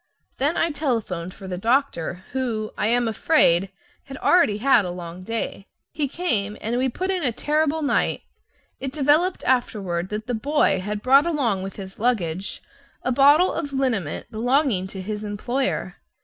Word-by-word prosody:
Then 290 +5 +1
I 335 - +2
telephoned 225 - -2
for 190 +1 -11
the 180 -1 -4
doctor, 220 - 0
who, 235 -5 -2
I - - 0
am 240 +1 +2
afraid, 195 - +3 0.4
had 270 -1 -8
already 335 - +3
had 245 -1 +4
a 180 - -4
long 175 0 -7
day. 220 -1 -4 0.2
He 295 -2 -1
came, 225 - -1
and 235 +3 -1
we 260 +1 +1
put 370 +9 -2
in 380 - 0
a 340 - -2
pretty 230 - -7
terrible 310 +1 +1
night. 285 - 0 0.6
It 270 0 -4
developed 310 +5 +2
afterward 195 -8 0
that 210 +1 -4
the 245 - -3
boy 260 -3 +2
had 210 +2 -4
brought 275 +5 +5
along 250 - 0
with 195 0 -6
his 195 0 -9
luggage 195 -6 -1 0.4
a 255 - 0
bottle 290 +7 +5
of 290 -4 -4
liniment 235 - -2
belonging 240 -3 +1
to 190 0 -7
his 210 +2 -4
employer. 240 +6 -2
235 Hz, 170 wpm, -23 LUFS, 195-280 Hz, 0.6 s, brought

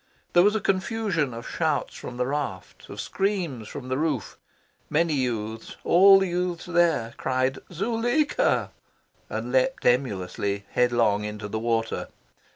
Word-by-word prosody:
There 175 - +7
was 205 +3 +4
a - - +2
confusion 195 - 0
of 115 0 -7
shouts - - -1
from 125 - -8
the 125 - 0
raft, 135 -9 -4
of - - -8
screams 175 - -2
from 130 +1 -8
the 130 +1 -1
roof. 150 -8 -1 0.5
Many 160 +1 +2
youths 115 -5 -3
all 195 +3 +7
the 190 0 +1
youths 175 -1 -2
there 170 -10 +2
cried 130 0 0
"Zuleika!" 235 - +1 0.6
and - - -4
leapt - - +1
emulously 100 -5 0
headlong 115 -4 +2
into 105 0 -5
the 110 +2 -3
water. 115 0 -1
135 Hz, 140 wpm, -25 LUFS, 115-180 Hz, 0.6 s, There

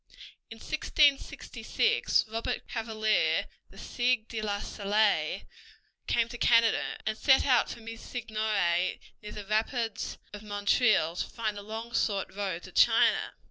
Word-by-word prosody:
In 225 - -10
1666 305 - +1
Robert 230 +3 -4
Cavalier, 215 -8 0 0.2
the - - -17
Sieur 245 -2 0
de 225 -2 -5
La 205 -1 -2
Salle, 200 -5 0 0.6
came 235 -1 +2
to 240 0 -9
Canada, 230 -1 +3
and 215 0 -1
set 265 +4 +4
out 255 -3 +3
from 230 - -9
his 230 0 -8
seigneurie 215 -7 -1 0.2
near 210 - -9
the 210 - -8
rapids 225 +1 -2 0.2
of 205 - -8
Montreal 205 -4 +1
to - - -3
find 220 -3 -3
the 205 - -7
long 225 +3 -7
sought 200 -4 -1
road 190 -4 -3
to - - -11
China. - - +3
220 Hz, 140 wpm, -29 LUFS, 205-235 Hz, 0.6 s, set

